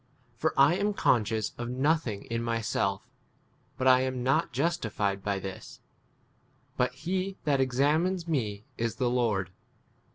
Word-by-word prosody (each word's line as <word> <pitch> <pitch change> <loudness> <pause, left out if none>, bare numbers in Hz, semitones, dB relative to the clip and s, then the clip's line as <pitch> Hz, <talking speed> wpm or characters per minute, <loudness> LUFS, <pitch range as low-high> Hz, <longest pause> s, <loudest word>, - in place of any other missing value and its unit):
For 160 +6 -1
I 150 +6 +6
am 205 +1 0
conscious 110 - +1
of 120 0 -3
no 135 +5 +3
thing 115 -11 -4
in 115 0 -3
myself; 115 -1 -1 0.7
but 130 - +1
I 130 0 +7
am 130 -1 -2
not 130 +1 +2
justified 110 - -1
by 100 -1 0
this: 95 -1 -8 1.0
but 125 0 +1
he 185 +6 -2
that 145 -3 +2
5 - - +1
examines 155 +8 +1
me 110 -9 -2
is 115 -1 -1
the 120 0 0
Lord. 105 -7 0
125 Hz, 150 wpm, -29 LUFS, 110-150 Hz, 1.0 s, I